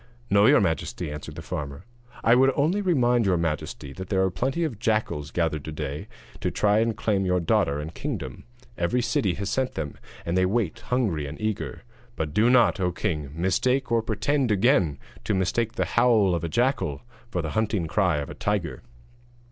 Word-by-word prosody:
'No, 100 +1 +6
your - - +6
majesty,' 80 -5 -1
answered 75 0 -7
the - - -7
farmer, 70 +3 -5 0.4
'I 115 - +5
would 135 +2 +5
only 165 +8 +2
remind 125 - +3
your 90 -2 +3
majesty 75 -3 -3
that 95 +3 -8
there 95 -2 +2
are 95 - +1
plenty 135 - -1
of 130 -11 -3
jackals 105 -11 0
gathered 80 -3 -1
to 80 - -5
day 75 -1 -5 0.3
to - - -1
try 105 0 +2
and 115 0 0
claim 100 -3 +1
your 90 -1 +2
daughter 75 -4 +1
and 75 +3 -6
kingdom: - - -5 0.4
every 85 +9 +1
city 120 - +1
has 100 0 -3
sent 130 -1 -1
them, 75 -3 -5 0.3
and 85 - -1
they 95 - +3
wait 105 -3 -1
hungry 100 - -1
and - - -8
eager; 110 -2 -3 0.3
but 75 -2 -3
do 110 +7 +4
not, 120 -3 +4
O 90 -1 +1
king, 80 -6 -2
mistake 125 +10 +1
or 115 -1 +3
pretend 125 +5 0
again 100 - +3 0.3
to 105 - 0
mistake 110 +5 0
the - - 0
howl 115 -6 +3
of 85 -1 -1
a 85 - -2
jackal 95 - 0 0.3
for 90 -7 -2
the 80 - -3
hunting 110 -5 0
cry 90 -1 +1
of 70 -1 -4
a - - -6
tiger.' 105 -5 -2
100 Hz, 195 wpm, -25 LUFS, 80-120 Hz, 0.4 s, No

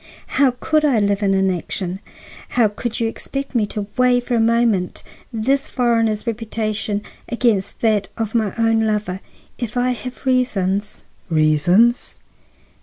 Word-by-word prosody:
How 260 -3 +4
could 310 -1 +1
I 280 -6 +3
live 200 -1 +1
in 195 -1 +2
inaction? 185 0 -1 0.6
How 235 -3 +6
could 225 +2 -4
you 230 - +1
expect 275 +4 -5
me 225 -4 +1
to 205 0 -4
weigh 250 -1 +4
for 245 0 -4
a 235 - +3
moment 225 -5 +1 0.3
this 265 +5 0
foreigner's 230 -3 +1
reputation 215 -2 -2 0.3
against 230 -5 0
that 215 -3 +2
of 220 -2 -2
my 220 -4 +1
own 225 -1 +2
lover? 210 -3 -1 0.4
If 240 0 -4
I 250 +1 +2
have 250 +3 -7
reasons—" 210 -6 0 0.3
"Reasons!" 170 +9 +3
225 Hz, 140 wpm, -20 LUFS, 205-240 Hz, 0.6 s, How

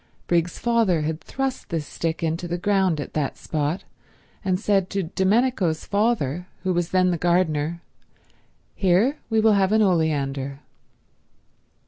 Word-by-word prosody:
Briggs's 170 0 0
father 230 -8 +2
had 155 +1 -3
thrust 270 -1 -4
this 165 -3 -2
stick 165 +2 -3
into 165 +2 -1
the 175 +1 -2
ground 190 -3 +1
at 145 - -6
that 150 -3 -2
spot, 155 +3 -2 0.6
and 185 -2 0
said 195 -3 +1
to 195 -1 -1
Domenico's 190 -1 +1
father, 190 - 0 0.2
who 185 -1 +1
was 175 -1 0
then 185 -1 +3
the 170 - -2
gardener, 170 -2 +1 0.9
"Here 200 +10 +2
we 225 -1 +2
will 220 0 +5
have 195 -1 +2
an 220 0 +4
oleander." 140 -6 0
180 Hz, 140 wpm, -24 LUFS, 160-200 Hz, 0.9 s, will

